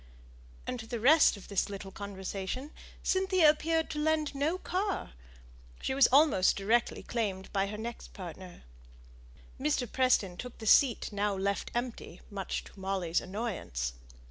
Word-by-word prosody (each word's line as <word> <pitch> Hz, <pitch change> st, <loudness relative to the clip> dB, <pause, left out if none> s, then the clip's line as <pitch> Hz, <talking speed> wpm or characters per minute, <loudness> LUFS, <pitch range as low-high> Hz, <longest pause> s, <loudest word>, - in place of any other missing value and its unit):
And 250 Hz, -, -3 dB
to 225 Hz, -, -8 dB
the 235 Hz, 0 st, -3 dB
rest 280 Hz, 0 st, +6 dB
of 200 Hz, -, -12 dB
this 200 Hz, 0 st, 0 dB
little 195 Hz, -1 st, -7 dB
conversation, 200 Hz, +7 st, -5 dB, 0.3 s
Cynthia 375 Hz, -3 st, +3 dB
appeared 320 Hz, +1 st, 0 dB
to 300 Hz, -, -3 dB
lend 310 Hz, -1 st, +1 dB
no 300 Hz, +6 st, 0 dB
ear; 370 Hz, -, +3 dB
and 400 Hz, -2 st, -3 dB, 0.7 s
she -, -, -2 dB
was 270 Hz, -2 st, +6 dB
almost 275 Hz, -9 st, +5 dB
directly 225 Hz, +5 st, +1 dB
claimed 200 Hz, -5 st, -3 dB
by 195 Hz, -1 st, +1 dB
her 210 Hz, +1 st, -5 dB
next 235 Hz, +2 st, -7 dB
partner. 180 Hz, -1 st, -9 dB, 1.0 s
Mr. 150 Hz, -, +1 dB
Preston 240 Hz, -7 st, +2 dB
took 250 Hz, +3 st, -7 dB
the 220 Hz, -, -8 dB
seat 235 Hz, -1 st, +4 dB
now 205 Hz, 0 st, 0 dB
left 200 Hz, +1 st, -1 dB
empty 240 Hz, -7 st, -4 dB
much 195 Hz, -2 st, -3 dB
to -, -, -15 dB
Molly's 190 Hz, -3 st, 0 dB
annoyance. 180 Hz, -, -3 dB
220 Hz, 150 wpm, -31 LUFS, 195-275 Hz, 1.0 s, rest